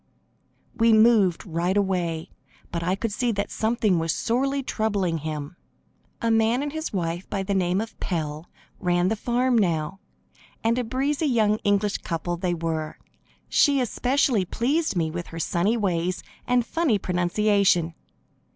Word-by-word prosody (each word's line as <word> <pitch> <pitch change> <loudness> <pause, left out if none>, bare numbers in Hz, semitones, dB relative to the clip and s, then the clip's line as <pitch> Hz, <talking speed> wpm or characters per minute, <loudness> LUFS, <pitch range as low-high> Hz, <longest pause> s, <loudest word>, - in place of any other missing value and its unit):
We 230 -1 +4
moved 215 -5 +4
right 175 +2 -1
away, 180 -4 -1 0.4
but 170 - -2
I 180 +3 0
could 225 +2 -3
see 240 +3 0
that 200 0 -3
something 220 -5 +1
was 165 0 0
sorely 275 +4 0
troubling 200 -9 -1
him. 155 +1 -5 0.7
A 230 - +2
man 225 +4 +2
and 290 0 -4
his 315 0 -4
wife 175 -1 -3
by 195 -2 -2
the 200 +1 -2
name 185 -1 +1
of 225 0 -6
Pell 155 -2 -3 0.3
ran 175 0 +1
the 220 - 0
farm 245 +3 +1
now, 175 -3 0 0.6
and 230 +2 +2
a - - 0
breezy, 275 +6 -1
young 215 -5 +2
English 205 -1 +1
couple 170 +1 -3
they 175 0 -1
were. 160 -2 -3 0.5
She 285 -2 +4
especially 250 -2 +1
pleased 275 - 0
me 160 -3 0
with 175 +1 -5
her 165 - -7
sunny 180 +8 +1
ways 185 -3 -1 0.2
and 245 -1 +2
funny 315 -6 +1
pronunciation. 180 -1 +2
200 Hz, 150 wpm, -25 LUFS, 175-230 Hz, 0.7 s, We